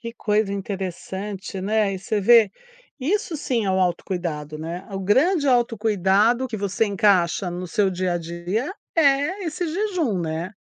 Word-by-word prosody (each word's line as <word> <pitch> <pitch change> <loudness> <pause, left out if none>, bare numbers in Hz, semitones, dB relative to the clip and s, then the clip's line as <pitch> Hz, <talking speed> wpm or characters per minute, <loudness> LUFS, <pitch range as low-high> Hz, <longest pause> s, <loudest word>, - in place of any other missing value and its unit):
Que 230 -1 -7
coisa 210 -2 0
interessante, 195 0 -5
né, 210 +1 +1
e 190 - -4
você 205 +2 -2
vê, 225 0 +6 0.5
isso 340 +4 -1
sim 240 -7 -1
é - - +1
o 190 - +1
autocuidado, 170 -4 -2
né, 165 +4 -6
o 195 - -4
grande 285 - +2
autocuidado 225 -1 +2
que 225 - -4
você 200 +2 0
encaixa 195 -3 +2
no 180 +1 -5
seu 200 +1 +1
dia 180 -1 -1
a - - 0
dia, 175 - -3 0.2
é 300 +5 +2
esse 340 +2 -3
jejum, 340 - -1
né. 165 +2 -3
200 Hz, 160 wpm, -23 LUFS, 185-240 Hz, 0.5 s, vê